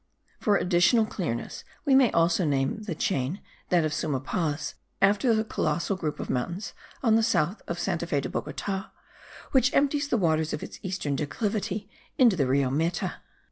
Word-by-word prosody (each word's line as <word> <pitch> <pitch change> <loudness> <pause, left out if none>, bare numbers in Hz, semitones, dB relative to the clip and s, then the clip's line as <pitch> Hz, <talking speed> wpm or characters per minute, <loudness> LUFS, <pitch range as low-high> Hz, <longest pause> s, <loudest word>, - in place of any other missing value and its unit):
For 210 - +2
additional 180 +6 +4
clearness, 165 - -4 0.2
we 280 - +3
may 265 -3 +6
also 170 +2 +3
name 140 +5 0
the 205 -6 -4
chain, 150 +2 -1 0.3
that 175 -3 +3
of 155 - -1
Suma 145 -3 -1
Paz, 150 +2 -2 0.3
after 210 +4 +4
the 220 - +1
colossal 195 -3 -1
group 155 -5 -3
of - - -4
mountains 175 - -3 0.3
on 225 -3 +4
the 225 - +4
south 215 -4 +1
of 170 - -3
Santa 170 -1 -2
Fe 145 - +1
de 135 - -3
Bogota, 195 -1 -4 0.6
which 260 -1 +4
empties 285 +1 +2
the 250 - +1
waters 160 -5 +1
of 150 - -4
its - - -9
eastern 185 -7 -2
declivity 205 - -2 0.3
into 240 -6 +6
the 140 -6 +1
Rio 135 0 +2
Meta. 165 +5 -1
180 Hz, 175 wpm, -27 LUFS, 150-215 Hz, 0.6 s, may